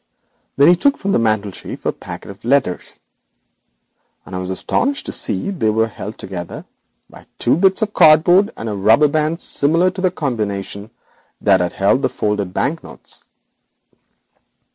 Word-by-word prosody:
Then 140 - +5
he 175 - +7
took 280 +10 +2
from 200 - -2
the - - +2
mantelshelf 110 -3 -3
a - - +2
packet - - -9
of 100 - -16
letters, 120 -7 -1 1.3
and 95 - -8
I - - -3
was 90 0 -5
astonished 275 - -1
to - - -4
see 200 - -2
they 150 - 0
were 110 +1 +2
held 110 -1 -8
together 90 -3 -7 0.4
by - - -16
two - - +2
bits 190 +5 +3
of 210 -1 -3
cardboard 175 +5 +5
and 115 - -6
a 105 - -2
rubber 110 +9 +4
band 155 +3 -1
similar 165 +6 +2
to 185 0 -7
the 185 - +3
combination 105 - -4 0.5
that 95 -2 +3
had 90 -1 -1
contained 100 +7 +1
the - - +2
folded 105 -3 -2
bank 160 - -2
notes. - - -12
120 Hz, 165 wpm, -18 LUFS, -, 1.3 s, he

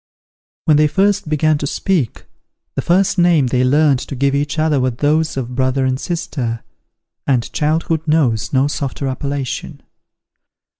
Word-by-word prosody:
When 155 -2 +4
they 150 0 +4
first 195 +1 +1
began 155 0 +2
to 145 - -2
speak, 160 - -1 0.5
the - - -2
first 185 +2 +2
name 170 -5 +4
they 125 0 +1
learned 140 +1 +3
to 140 - -6
give 140 +1 +1
each 145 +2 -1
other 155 -2 +2
were 130 0 +1
those 150 +5 0
of 125 -1 -4
brother 130 +1 0
and 130 0 0
sister, 130 -9 -3 0.6
and 125 -4 0
childhood 160 +1 0
knows 135 -9 +1
no 135 +1 +2
softer 140 -1 -3
appellation. 135 0 -4
145 Hz, 150 wpm, -18 LUFS, 130-155 Hz, 0.6 s, When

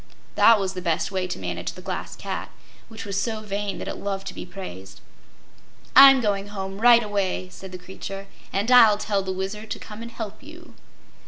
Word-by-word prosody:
That 230 -2 +6
was 190 -1 -2
the 185 - -5
best 170 +1 -1
way 185 -1 -1
to 180 - -4
manage 90 -2 -4
the - - -11
Glass - - -5
Cat, - - -5 0.4
which 225 0 -9
was 200 0 -2
so 220 +1 -3
vain 205 -1 -3
that - - -6
it - - -4
loved 195 -1 -4
to - - -9
be - - -8
praised. 95 - -9 1.0
"I'm 270 0 +10
going 200 -2 -1
home 195 0 -6
right 235 0 +7
away," 195 -3 -2
said 190 0 -11
the 185 - -6
creature, 195 +2 -8 0.3
"and 205 +5 -1
I'll 225 -4 +8
tell 205 -1 -1
the 190 0 -4
Wizard 195 +3 -5
to - - -3
come 215 +1 -10
and 235 - -7
help 215 -3 -7
you." 330 +4 -13
200 Hz, 200 wpm, -24 LUFS, 190-220 Hz, 1.0 s, I'm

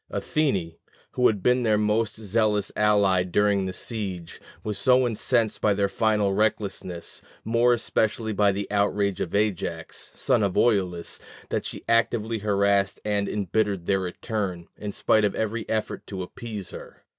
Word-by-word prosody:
Athene, 100 - -1 0.4
who 125 - +3
had 100 -4 -1
been 125 +1 +3
their 110 -3 +3
most 105 +1 +1
zealous 105 -1 0
ally 100 -3 +3
during 100 +1 +1
the - - -3
siege, 95 -6 -5 0.2
was 105 -2 -2
so 125 +4 +4
incensed 115 -1 0
by 105 -2 +3
their 100 0 +2
final 105 -1 +1
recklessness, 100 -4 -2 0.2
more 115 +2 +3
especially 110 -1 0
by 100 0 +3
the 100 +1 -3
outrage 100 -1 +1
of 85 - -3
Ajax, 90 -6 -2
son 125 -4 +2
of 100 -3 0
Oileus, 95 -7 +1 0.3
that - - -2
she - - -8
actively 115 -1 +1
harassed 100 -1 +1
and 100 -1 0
embittered 100 -2 -1
their 95 +1 +2
return, 95 -1 -4
in 105 -1 -5
spite 110 +1 +2
of 105 - +1
every 110 0 -2
effort 110 -1 -2
to 95 -2 -5
appease 105 0 -7
her. - - -11
105 Hz, 155 wpm, -25 LUFS, 95-110 Hz, 0.4 s, so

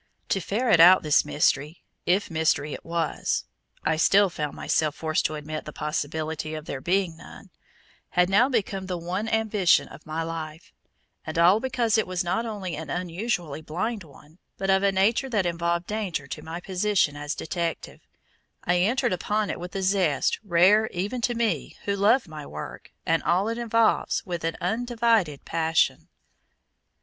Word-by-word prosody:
To 195 - +1
ferret 215 0 +2
out 180 +3 +8
this 150 -2 +4
mystery, 150 +2 0 0.2
if 185 +2 +1
mystery 155 -2 +1
it - - -8
was, 165 -1 -1 0.4
I 155 +1 +1
still 195 +4 +4
found 150 -3 -4
myself 155 -1 0
forced 155 -1 -1
to 155 - 0
admit 155 +1 -6
the 150 - -7
possibility 155 +1 -3
of 155 0 -7
there 135 -4 -5
being 180 0 0
none - - -13 0.6
had 180 0 +3
now 205 +8 +4
become 195 -6 -1
the 180 -1 -2
one 185 +6 -3
ambition 215 -5 +3
of 155 - -14
my 160 +1 -2
life; 160 0 -7 0.5
and 155 0 -6
all 175 +5 +6
because 240 -3 +1
it 220 - -1
was 185 0 -1
not 190 +7 -1
only 195 -6 -4
an 155 0 -7
unusually 175 -2 -3
blind 190 +7 -3
one, 150 +2 -18 0.2
but 195 0 0
of 190 0 +4
a 200 0 +3
nature 215 +7 +2
that 210 -6 +1
involved 170 0 -1
danger 200 -9 -3
to 135 - -7
my 165 +2 -6
position 185 -4 +1
as 145 +1 -4
detective, 170 -1 -4 0.6
I 175 0 +2
entered 215 +2 +1
upon 210 +3 -1
it - - -6
with 180 +2 -8
a 195 - -2
zest 185 -6 +1
rare 200 +4 +4
even 205 +7 -3
to 240 +1 0
me 220 - -1
who 200 - 0
love 210 +4 +3
my 155 -2 -8
work 75 - -8
and 165 0 +2
all 185 +5 +1
it 230 +1 -3
involves 230 -1 +1
with 175 -3 -4
an 165 - -2
undivided 225 - 0
passion. 160 0 +1
180 Hz, 170 wpm, -25 LUFS, 160-205 Hz, 0.6 s, out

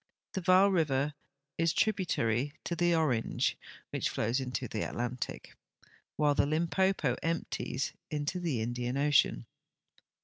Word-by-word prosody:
The 190 - -2
Vaal 185 +2 +5
river 150 -5 +1 0.5
is 165 -1 +3
tributary 145 - +1
to 170 - -2
the 175 0 +3
Orange, 135 -9 +1 0.4
which - - 0
flows 115 +4 0
into 130 -1 -3
the 110 - -3
Atlantic, 120 +1 -4 0.6
Avhile 145 -1 +3
the 140 - +3
Limpopo 165 -2 +1
emp 165 0 -2
ties 130 - -2 0.2
into 150 +4 -2
the 155 -10 -1
Indian 120 +2 -2
ocean. 140 - +3
145 Hz, 130 wpm, -31 LUFS, 125-170 Hz, 0.6 s, Vaal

